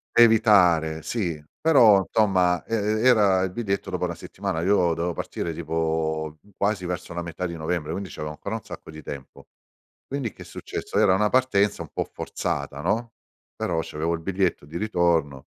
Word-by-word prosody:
Evitare, 90 Hz, -9 st, +5 dB
sì, 85 Hz, -10 st, -2 dB, 0.2 s
però, 115 Hz, -11 st, +6 dB
somma, 90 Hz, -5 st, +3 dB
e 115 Hz, -, -1 dB
e 110 Hz, +2 st, 0 dB
era 100 Hz, -6 st, +5 dB
il 95 Hz, -, -2 dB
biglietto 100 Hz, -3 st, -2 dB
dopo 90 Hz, -1 st, -1 dB
1 85 Hz, -1 st, -3 dB
settimana. 80 Hz, -, -4 dB
Io 90 Hz, -2 st, +3 dB
dovevo 85 Hz, +1 st, -1 dB
partire 85 Hz, 0 st, -4 dB
tipo 80 Hz, -1 st, -2 dB, 0.2 s
quasi 100 Hz, -2 st, 0 dB
verso 90 Hz, -1 st, -4 dB
la 85 Hz, -, -3 dB
metà 85 Hz, +1 st, -5 dB
di 85 Hz, -1 st, -4 dB
novembre, 80 Hz, -1 st, -2 dB
quindi, 95 Hz, +2 st, -4 dB
c'avevo 75 Hz, 0 st, -5 dB
ancora 100 Hz, +8 st, -5 dB
un 110 Hz, -, -6 dB
sacco -, -, -10 dB
di 80 Hz, -1 st, -10 dB
tempo. 70 Hz, -2 st, -9 dB, 0.6 s
Quindi, 135 Hz, -5 st, -3 dB
che -, -, -12 dB
è -, -, -9 dB
successo? -, -, -5 dB
Era 95 Hz, -, +5 dB
una 105 Hz, +2 st, +2 dB
partenza 105 Hz, -6 st, +2 dB
un -, -, -10 dB
po' -, -, -1 dB
forzata, 70 Hz, 0 st, -4 dB
no, 115 Hz, +8 st, -1 dB, 0.4 s
però, 85 Hz, -2 st, -1 dB
c'avevo 80 Hz, +2 st, -2 dB
il 85 Hz, -, -3 dB
biglietto 95 Hz, -3 st, -1 dB
di 80 Hz, +4 st, -8 dB
ritorno 85 Hz, -9 st, 0 dB
90 Hz, 175 wpm, -25 LUFS, 80-105 Hz, 0.6 s, però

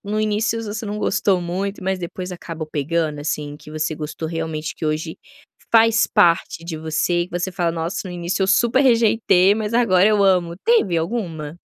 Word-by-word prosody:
no 210 Hz, +1 st, -1 dB
início 215 Hz, +2 st, 0 dB
você 215 Hz, +1 st, -5 dB
não 210 Hz, 0 st, -4 dB
gostou 190 Hz, -3 st, +1 dB
muito, 190 Hz, +4 st, -4 dB
mas 190 Hz, 0 st, -1 dB
depois 180 Hz, +1 st, -6 dB
acabou 165 Hz, -3 st, -7 dB
pegando, 155 Hz, 0 st, -1 dB
assim, 145 Hz, -1 st, -3 dB
que 150 Hz, 0 st, -14 dB
você 155 Hz, 0 st, -2 dB
gostou 155 Hz, +1 st, -5 dB
realmente, 160 Hz, -1 st, -4 dB
que -, -, -7 dB
hoje 155 Hz, +1 st, -2 dB, 0.6 s
faz 225 Hz, 0 st, +5 dB
parte 170 Hz, -4 st, +2 dB
de 170 Hz, -2 st, -5 dB
você 160 Hz, +2 st, 0 dB
e -, -, -5 dB
que 175 Hz, -, -3 dB
você 185 Hz, +2 st, -2 dB
fala: 175 Hz, -2 st, -1 dB
"Nossa, 165 Hz, +2 st, -3 dB
no -, -, -6 dB
início 175 Hz, +2 st, -2 dB
eu -, -, +2 dB
super 235 Hz, +6 st, +3 dB
rejeitei, 225 Hz, -6 st, +4 dB
mas 215 Hz, 0 st, -3 dB
agora 195 Hz, -6 st, +4 dB
eu 210 Hz, -2 st, +3 dB
amo", 180 Hz, -3 st, +2 dB
teve 455 Hz, -, +3 dB
alguma? 165 Hz, -5 st, -4 dB
180 Hz, 190 wpm, -21 LUFS, 160-210 Hz, 0.6 s, faz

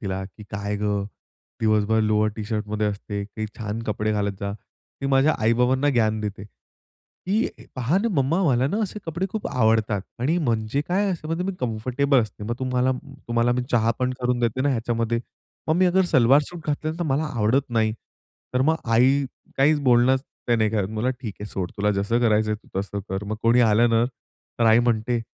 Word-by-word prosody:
तिला 95 Hz, -3 st, -3 dB
की 100 Hz, +3 st, -12 dB
काय 100 Hz, 0 st, -3 dB
गं, 100 Hz, -1 st, -1 dB, 0.6 s
दिवसभर 110 Hz, 0 st, +2 dB
लोवर 110 Hz, 0 st, +2 dB
टी-शर्टमध्ये 105 Hz, 0 st, -2 dB
असते? 100 Hz, 0 st, -3 dB
काही 110 Hz, +1 st, -5 dB
छान 110 Hz, +1 st, -4 dB
कपडे 110 Hz, 0 st, -1 dB
घालत 100 Hz, -1 st, 0 dB
जा. 100 Hz, 0 st, -2 dB
ती 135 Hz, +5 st, -11 dB
माझ्या 135 Hz, +3 st, +3 dB
आई-बाबांना 125 Hz, +5 st, +2 dB
ज्ञान 110 Hz, -4 st, +2 dB
देते, 105 Hz, -1 st, -5 dB
"की 195 Hz, -, -5 dB, 0.3 s
पहा 130 Hz, +9 st, +1 dB
ना 230 Hz, +3 st, 0 dB
मम्मा, 165 Hz, +9 st, +1 dB
मला 130 Hz, -3 st, +3 dB
ना 205 Hz, -, -1 dB
असे 210 Hz, +1 st, -4 dB
कपडे 170 Hz, +4 st, -2 dB
खूप 215 Hz, 0 st, -3 dB
आवडतात.आणि 110 Hz, -, 0 dB
म्हणजे 115 Hz, -2 st, 0 dB
काय 195 Hz, +3 st, +1 dB
असं 165 Hz, -4 st, -4 dB
म्हणजे 165 Hz, +2 st, -1 dB
मी 195 Hz, -, -1 dB
कम्फर्टेबल 125 Hz, +4 st, +1 dB
असते 105 Hz, -1 st, -8 dB
मग 120 Hz, +2 st, -2 dB
तुम्हाला 130 Hz, 0 st, +1 dB, 0.4 s
तुम्हाला 120 Hz, +1 st, +2 dB
मी 125 Hz, 0 st, 0 dB
चहा 115 Hz, -1 st, +3 dB
पण 125 Hz, 0 st, 0 dB
करून 125 Hz, 0 st, +1 dB
देते 120 Hz, +2 st, 0 dB
ना 145 Hz, -, +2 dB
ह्याच्यामध्ये. 115 Hz, -1 st, -1 dB, 0.5 s
मग 160 Hz, -, +3 dB
मी 185 Hz, 0 st, +4 dB, 0.2 s
सलवार 135 Hz, -1 st, +5 dB
सूट 175 Hz, -2 st, -8 dB
घातली 150 Hz, +1 st, -1 dB
तर -, -, -1 dB
मला 145 Hz, +2 st, 0 dB
आवडत 120 Hz, +5 st, +1 dB
नाही." 110 Hz, -2 st, +2 dB, 0.6 s
तर 125 Hz, -, +2 dB
मग 160 Hz, +3 st, +3 dB
आई 130 Hz, +5 st, +3 dB, 0.3 s
काहीच 145 Hz, +2 st, +4 dB
बोलणं 125 Hz, 0 st, +4 dB, 0.3 s
ते 120 Hz, -, +4 dB
नाही 110 Hz, -1 st, +2 dB
का, 105 Hz, -3 st, 0 dB
मला 110 Hz, +4 st, -1 dB
ठीक 120 Hz, -6 st, -6 dB
आहे 105 Hz, -, -5 dB
सोड 90 Hz, -2 st, -3 dB
तुला 105 Hz, +1 st, +1 dB
जसं 100 Hz, +4 st, 0 dB
करायचं 110 Hz, -2 st, +2 dB
आहे 105 Hz, -, 0 dB
तू 95 Hz, -, -5 dB
तसं 100 Hz, 0 st, -5 dB
कर. 95 Hz, +2 st, -3 dB
मग 110 Hz, +1 st, -3 dB
कोणी 115 Hz, +2 st, +4 dB
आलं 115 Hz, +1 st, +4 dB
ना, 115 Hz, +1 st, +3 dB, 0.5 s
तर 115 Hz, -, +3 dB
आई 110 Hz, +1 st, +6 dB
म्हणते, 120 Hz, 0 st, +1 dB
115 Hz, 190 wpm, -24 LUFS, 105-135 Hz, 0.6 s, आई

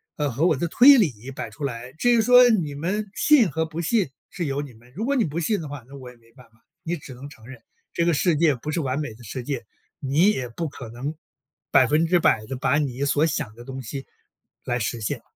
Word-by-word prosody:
呃， 145 Hz, -3 st, -1 dB
和 150 Hz, +9 st, +1 dB
我 155 Hz, -, +3 dB
的 170 Hz, +5 st, -2 dB
推 270 Hz, +7 st, +8 dB
理 135 Hz, -, 0 dB
摆 -, -, -6 dB
出 145 Hz, -, -10 dB
来。 125 Hz, -1 st, -5 dB
至 245 Hz, +10 st, 0 dB
于 235 Hz, -2 st, +4 dB
说 250 Hz, +1 st, +7 dB
你 170 Hz, -10 st, +1 dB
们， 195 Hz, +7 st, -3 dB
信 250 Hz, -, +4 dB
和 160 Hz, +3 st, -1 dB
不 160 Hz, +1 st, -5 dB
信 195 Hz, -, +1 dB, 0.2 s
是 175 Hz, -3 st, -4 dB
由 140 Hz, 0 st, -2 dB
你 140 Hz, -4 st, -9 dB
们， 120 Hz, +3 st, -20 dB
如 220 Hz, +4 st, -3 dB
果 280 Hz, +1 st, +1 dB
你 240 Hz, -, +2 dB
不 160 Hz, +2 st, -3 dB
信 200 Hz, +4 st, 0 dB
的 155 Hz, -, -6 dB
话， 140 Hz, -4 st, -8 dB
那 140 Hz, -, -12 dB
我 125 Hz, -2 st, -10 dB
也 125 Hz, -, -15 dB
没 115 Hz, 0 st, -25 dB
办 120 Hz, -1 st, -18 dB
法。 110 Hz, 0 st, -32 dB, 0.2 s
你 175 Hz, +1 st, -3 dB
只 135 Hz, -4 st, -10 dB
能 135 Hz, +4 st, -10 dB
承 110 Hz, -5 st, -16 dB
认， 125 Hz, -2 st, -12 dB, 0.3 s
这 170 Hz, -, 0 dB
个 170 Hz, -, +3 dB
世 165 Hz, +2 st, +2 dB
界 155 Hz, -4 st, +3 dB
不 150 Hz, +6 st, -6 dB
是 170 Hz, -, -1 dB
完 135 Hz, -1 st, -2 dB
美 145 Hz, -7 st, -4 dB
的 120 Hz, +2 st, -16 dB
世 120 Hz, +4 st, -6 dB
界。 130 Hz, -4 st, -4 dB, 0.3 s
你 155 Hz, +9 st, +3 dB
也 130 Hz, -10 st, -3 dB
不 160 Hz, +7 st, -4 dB
可 125 Hz, -4 st, -10 dB
能 130 Hz, +6 st, -5 dB, 0.6 s
100% 150 Hz, -3 st, +3 dB
地 135 Hz, -, -4 dB
把 130 Hz, +3 st, +1 dB
你 135 Hz, -2 st, -2 dB
所 145 Hz, +2 st, +2 dB
想 130 Hz, -8 st, -3 dB
的 120 Hz, +2 st, -12 dB
东 130 Hz, 0 st, -7 dB
西， 135 Hz, +4 st, -7 dB, 0.6 s
来 120 Hz, 0 st, -2 dB
实 115 Hz, +1 st, -2 dB
现。 105 Hz, -, -3 dB
145 Hz, 260 characters per minute, -24 LUFS, 125-170 Hz, 0.6 s, 推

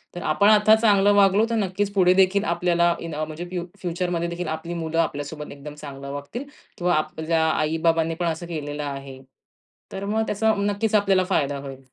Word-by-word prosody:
तर 175 Hz, -, -5 dB
आपण 180 Hz, +7 st, +3 dB
आता 215 Hz, 0 st, +6 dB
चांगलं 205 Hz, -2 st, +4 dB
वागलो 200 Hz, +2 st, +4 dB
तर 230 Hz, -, 0 dB
नक्कीच 200 Hz, -1 st, -1 dB
पुढे 185 Hz, -2 st, +4 dB
देखील 190 Hz, +1 st, +3 dB
आपल्याला 170 Hz, 0 st, +2 dB
इन 165 Hz, -2 st, -6 dB
अ, 155 Hz, -, -2 dB
म्हणजे 155 Hz, +3 st, -7 dB
फ्यु 180 Hz, -1 st, -4 dB, 0.2 s
फ्युचरमध्ये 175 Hz, -1 st, -2 dB
देखील 175 Hz, +1 st, -4 dB
आपली 160 Hz, +2 st, -4 dB
मुलं 165 Hz, -1 st, -2 dB
आपल्यासोबत 150 Hz, -1 st, -3 dB
एकदम 145 Hz, +1 st, -9 dB
चांगलं 140 Hz, -2 st, -8 dB
वागतील 145 Hz, -, -6 dB, 0.3 s
किंवा 175 Hz, 0 st, +1 dB
आपल्या 160 Hz, +1 st, 0 dB
आई-बाबांनी 165 Hz, +1 st, +1 dB
पण 175 Hz, -, -2 dB
असं 165 Hz, +1 st, -3 dB
केलेलं 150 Hz, -3 st, -5 dB
आहे. 135 Hz, -2 st, -7 dB, 0.7 s
तर 195 Hz, +1 st, -5 dB
मग 215 Hz, +2 st, 0 dB
त्याचा 220 Hz, +2 st, +1 dB
नक्कीच 205 Hz, +2 st, 0 dB
आपल्याला 195 Hz, -2 st, +3 dB
फायदा 145 Hz, -7 st, 0 dB
होईल. 135 Hz, -1 st, -8 dB
170 Hz, 180 wpm, -23 LUFS, 155-195 Hz, 0.7 s, आता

